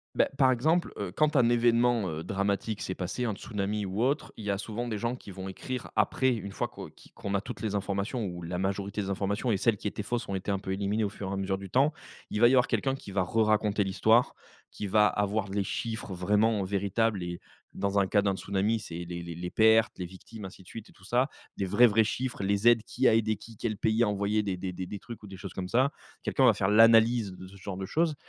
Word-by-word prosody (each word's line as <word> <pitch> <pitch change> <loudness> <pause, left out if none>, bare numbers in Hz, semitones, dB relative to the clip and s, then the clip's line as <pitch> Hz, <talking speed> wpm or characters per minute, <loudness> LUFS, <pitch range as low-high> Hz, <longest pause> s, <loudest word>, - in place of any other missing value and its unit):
Beh, - - +4
par 130 -2 +5
exemple, 160 +8 +1
heu, - - -4
quand 155 -1 +2
un 120 -2 +5
événement, 120 -3 +3
heu, 80 0 -4
dramatique 100 +3 -1
s'est 95 - -3
passé, 95 +7 -3
un 110 -3 0
tsunami 105 0 -3
ou 100 +5 -1
autre, 140 +4 0
il 110 - -9
y 100 - -1
a 100 - 0
souvent 115 +4 -4
des 110 - -2
gens 120 +3 -2
qui 105 - -11
vont 95 0 -7
écrire, 125 +6 -5
après, 130 +5 +2
une 100 -3 -6
fois - - -2
qu'on - - -9
qui - - -20
qu'on 100 - -5
a 100 - +2
toutes - - -8
les 105 -2 -2
informations 100 +4 -2
ou 90 -2 -5
la 90 +1 -4
majorité 100 +2 -2
des 100 - -4
informations 100 +4 0
et - - +1
celles 110 0 +2
qui 105 - -4
étaient 105 - -4
fausses 120 +2 -3
ont 100 - -2
été 95 +2 -2
un 100 - 0
peu 95 -1 -4
éliminées 105 +2 0
au - - -1
fur 100 -1 -6
et - - -3
à - - -2
mesure 95 0 -1
du 100 -1 -9
temps. 140 +7 +3 0.4
Il 105 - -2
va 120 - +8
y - - +2
avoir 125 -1 +4
quelqu'un 135 -1 0
qui 120 -7 -8
va 95 -2 +2
re-raconter 105 0 +2
l'histoire, 110 +5 +3 0.3
qui 105 - -6
va 105 +1 +5
avoir 105 +1 0
les 100 0 0
chiffres 110 -1 -4
vraiment 105 +4 +2
véritables 100 +1 0
et 85 0 -5 0.3
dans 100 0 0
un 100 - +3
cas 100 +2 +2
d'un 100 -1 +1
tsunami, 100 +4 0
c'est 85 +1 -6
les 85 0 -6
les 85 -1 -6
les 90 +2 -5
pertes, 110 +2 +4
les 90 - -4
victimes, 95 +4 -11
ainsi 95 0 -9
de 90 - -19
suite 110 0 -9
et - - -17
tout 95 - -19
ça. 125 +6 +2 0.3
Les 100 - -2
vrais 105 +6 -1
les - - +8
vrais 110 +1 +4
chiffres, 120 -1 -3
les 100 +3 +1
aides, 115 -2 +6
qui 130 +3 +1
a 110 - +5
aidé 110 -2 +1
qui, 115 +1 -13
quel 110 -1 -3
pays 110 +3 +2
a 105 - +2
envoyé 105 +1 0
des 95 -3 -2
des 90 0 -4
des 95 +2 -6
trucs 115 -3 -10
ou - - -9
des 95 -1 -9
choses 95 -1 -8
comme 90 -1 -5
ça? 130 +4 +3 0.3
Quelqu'un 135 - +1
va 115 - +7
faire 95 -1 0
l'analyse 115 0 +5
de 95 0 -10
ce 100 - -14
genre 95 -1 -6
de 95 - -4
choses. 160 - +1
105 Hz, 265 wpm, -29 LUFS, 95-115 Hz, 0.4 s, va